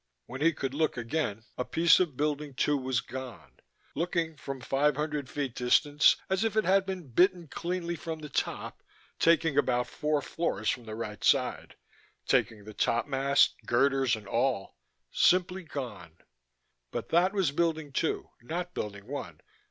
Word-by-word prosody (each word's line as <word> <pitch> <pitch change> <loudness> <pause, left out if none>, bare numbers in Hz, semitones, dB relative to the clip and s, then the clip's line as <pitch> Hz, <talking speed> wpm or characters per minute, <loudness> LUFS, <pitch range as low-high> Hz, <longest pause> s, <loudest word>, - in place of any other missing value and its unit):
When 130 - -8
he 165 +2 +5
could 135 -4 -4
look 155 -2 0
again 115 -3 -2
a - - +1
piece 165 +5 +4
of 165 -8 0
Building 150 -1 -2
Two 145 +3 +2
was 130 -3 0
gone 130 -3 -9 0.3
looking, 165 -1 -1
from 135 -2 -6
five 140 +4 +1
hundred 150 -3 -3
feet 140 -4 -3
distance, 145 +5 +4
as 190 +2 0
if 225 -2 0
it 215 - +2
had 190 0 +3
been 185 -5 -5
bitten 175 - +3
cleanly 170 +2 -3
from 160 -1 -5
the 155 -1 -8
top, 140 - -3 0.4
taking 165 -3 +4
about 125 0 +1
four 150 +3 -1
floors 110 -10 -1
from 120 - -6
the 110 -1 -6
right 105 -2 -6
side, 130 -3 +1 0.5
taking 105 -2 +1
the 110 +1 -10
topmast, 135 +5 +2
girders, 135 0 +3
and 105 -2 -11
all... 120 -2 0 0.4
simply 185 +1 +3
gone. 125 - -7 0.7
But - - -5
that 175 +3 +4
was 190 -7 +1
Building 160 -1 -1
Two, 160 - -1
not 175 +7 -4
Building 100 -6 -5
One. 140 +4 -6
145 Hz, 160 wpm, -29 LUFS, 125-165 Hz, 0.7 s, he